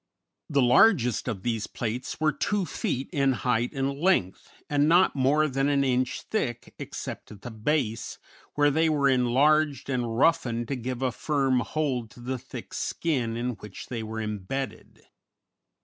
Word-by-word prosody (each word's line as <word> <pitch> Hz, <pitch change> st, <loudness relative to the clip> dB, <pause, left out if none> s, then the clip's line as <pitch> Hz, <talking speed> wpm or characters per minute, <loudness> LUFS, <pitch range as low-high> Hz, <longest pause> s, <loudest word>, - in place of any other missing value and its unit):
_] -, -, -57 dB, 0.5 s
The 140 Hz, -, +5 dB
largest 125 Hz, -, +4 dB
of 105 Hz, -6 st, -3 dB
these 115 Hz, -3 st, -1 dB
plates 120 Hz, +2 st, -4 dB
were 155 Hz, 0 st, +3 dB
two 205 Hz, +2 st, -1 dB
feet 135 Hz, -3 st, -3 dB
in 140 Hz, -3 st, +2 dB
height 120 Hz, -1 st, 0 dB
and 140 Hz, 0 st, -2 dB
length, 160 Hz, -, +1 dB, 0.2 s
and 145 Hz, +1 st, +2 dB
not 175 Hz, +1 st, +5 dB
more 145 Hz, +3 st, +3 dB
than 135 Hz, 0 st, 0 dB
an 140 Hz, -1 st, +2 dB
inch 130 Hz, -1 st, 0 dB
thick, 120 Hz, -, -3 dB
except -, -, -7 dB
at 100 Hz, -2 st, -13 dB
the 120 Hz, -, -6 dB
base, 115 Hz, 0 st, -1 dB, 0.4 s
where 145 Hz, 0 st, +4 dB
they 160 Hz, +3 st, +2 dB
were 145 Hz, -3 st, +2 dB
enlarged 135 Hz, +3 st, +2 dB
and 120 Hz, -3 st, -1 dB
roughened 125 Hz, -6 st, +2 dB
to 140 Hz, -, -1 dB
give 125 Hz, +1 st, -4 dB
a 130 Hz, -, +1 dB
firm 135 Hz, +1 st, +1 dB
hold 130 Hz, -4 st, -2 dB
to 120 Hz, -, -16 dB
the 125 Hz, +1 st, -4 dB
thick 125 Hz, -1 st, -9 dB
skin 125 Hz, -9 st, -1 dB
in 125 Hz, +1 st, -1 dB
which 105 Hz, -1 st, -10 dB
they 120 Hz, -3 st, -3 dB
were 110 Hz, 0 st, -5 dB
imbedded. 110 Hz, +5 st, -5 dB
130 Hz, 165 wpm, -27 LUFS, 120-145 Hz, 0.5 s, The